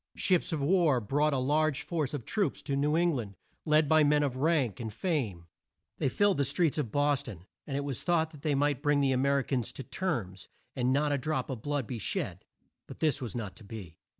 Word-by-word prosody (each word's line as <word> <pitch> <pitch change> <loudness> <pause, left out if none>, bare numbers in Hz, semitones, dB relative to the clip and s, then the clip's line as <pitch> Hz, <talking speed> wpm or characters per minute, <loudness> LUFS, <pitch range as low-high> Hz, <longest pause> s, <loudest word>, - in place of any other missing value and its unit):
Ships 180 -3 +2
of 155 -3 -1
war 165 -5 +3
brought 145 +8 +1
a 140 - +1
large 145 +2 +1
force 155 -5 -2
of 125 -6 -6
troops 205 -3 -1
to 140 - -2
New 145 +2 +1
Eng 170 +1 +3
land, 110 -7 -4 0.3
led 155 0 +4
by 155 +1 +5
men 150 0 +4
of 135 -3 -1
rank 140 - +1
and 110 -2 -4
fame. 115 - -2 0.5
They - - +1
filled 205 +3 +2
the 140 - +2
streets 150 +3 +1
of 125 -8 -2
Bos 145 -1 +2
ton, 95 -7 -10 0.2
and 140 -2 -2
it 140 - -1
was 140 -4 -4
thought 160 -4 0
they 150 -2 +1
might 145 -1 +1
bring 145 -1 +2
the 140 -1 +2
A 130 - +2
mer 140 +2 +2
i 135 - +1
cans 125 -4 -2
to 135 - -6
terms, 120 - -3 0.3
and 125 0 +1
not 145 +2 +2
a 140 - +1
drop 155 +1 -2
of 125 -4 -5
blood 145 -1 -1
be 120 +1 -5
shed. - - -3 0.4
But - - -10
this 150 -3 +1
was 120 -3 -5
not 105 -6 -4
to - - -13
be. 100 -6 -9
140 Hz, 230 wpm, -30 LUFS, 125-155 Hz, 0.5 s, by